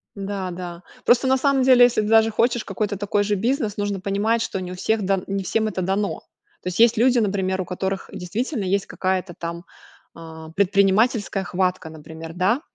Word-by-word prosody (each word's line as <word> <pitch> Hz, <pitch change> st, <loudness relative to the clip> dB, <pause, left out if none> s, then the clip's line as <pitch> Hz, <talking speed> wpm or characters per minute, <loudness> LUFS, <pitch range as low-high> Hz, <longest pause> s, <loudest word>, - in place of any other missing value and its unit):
Да, 195 Hz, -2 st, -4 dB
да. 175 Hz, 0 st, -7 dB, 0.2 s
Просто, 245 Hz, +2 st, +4 dB
на 265 Hz, 0 st, +4 dB
самом 275 Hz, 0 st, +2 dB
деле, 255 Hz, -1 st, +7 dB
если 240 Hz, -3 st, +2 dB
ты 210 Hz, -, -3 dB
даже 225 Hz, 0 st, +5 dB
хочешь 235 Hz, +1 st, +1 dB
какой-то 205 Hz, -2 st, -3 dB
такой 205 Hz, +1 st, 0 dB
же 205 Hz, 0 st, 0 dB
бизнес, 225 Hz, +1 st, -1 dB
нужно 205 Hz, -2 st, -2 dB
понимать, 205 Hz, +4 st, 0 dB
что 195 Hz, -, -3 dB
не 180 Hz, -, -6 dB
у -, -, -6 dB
всех 220 Hz, +3 st, 0 dB
дан 195 Hz, -1 st, 0 dB
не 195 Hz, 0 st, -2 dB
всем 220 Hz, +4 st, 0 dB
это 190 Hz, -3 st, -3 dB
дано. 195 Hz, +3 st, -1 dB, 0.4 s
То 180 Hz, -, -3 dB
есть 225 Hz, +6 st, +4 dB
люди, 245 Hz, +2 st, +4 dB
например, 190 Hz, -3 st, 0 dB
у -, -, -4 dB
которых 190 Hz, +2 st, -4 dB
действительно 220 Hz, -, -3 dB
есть 195 Hz, +1 st, 0 dB
какая-то 185 Hz, -1 st, -2 dB
там, 170 Hz, +1 st, -6 dB, 0.5 s
а, 160 Hz, -1 st, -10 dB
предпринимательская 200 Hz, +3 st, +2 dB
хватка. 180 Hz, -2 st, -1 dB
Например, 160 Hz, +1 st, -10 dB
да, 190 Hz, -, +1 dB
200 Hz, 190 wpm, -22 LUFS, 185-225 Hz, 0.5 s, деле